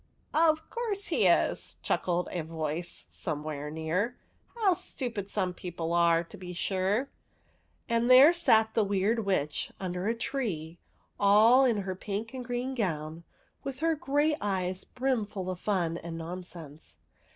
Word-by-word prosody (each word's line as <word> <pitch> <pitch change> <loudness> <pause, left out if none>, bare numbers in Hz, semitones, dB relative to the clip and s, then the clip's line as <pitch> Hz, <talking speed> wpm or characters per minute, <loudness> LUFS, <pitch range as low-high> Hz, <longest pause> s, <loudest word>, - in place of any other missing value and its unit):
*' - - -38 0.2
Of 310 +1 0
course 435 -4 -2
he - - +3
is! - - +2
" - - -36
chuckled 175 0 0
a 175 - -2
voice 160 +1 -4
some 150 -4 -4
where 150 -1 -4
near. 165 +10 -1 0.2
'' - - -37
How 410 -5 +4
stupid 245 - -4
some 185 -4 -1
people 170 -2 -4
are, 170 -1 +4
to 165 - -12
be 180 -1 -7
sure! 195 +8 0 0.4
" - - -40
And 235 0 +1
there 265 +6 +9
sat 220 -10 +4
the 220 - +3
Weird 200 +3 +1
Witch 155 -7 -1
under 180 0 -3
a 230 - +1
tree, 200 - -3 0.4
all 220 +6 +6
in 225 -5 +2
her 190 0 -3
pink 210 +5 -5
and 255 -1 -5
green 245 +2 -3
gown, 165 -7 -3 0.4
with 275 0 -6
her 330 0 +3
great 295 +1 +1
eyes 185 -2 -1
brimful 215 -8 -2
of 180 - -6
fun 175 -5 0
and 165 -1 -6
non 170 +3 -5
sense. 160 -4 -10
195 Hz, 165 wpm, -29 LUFS, 170-245 Hz, 0.4 s, there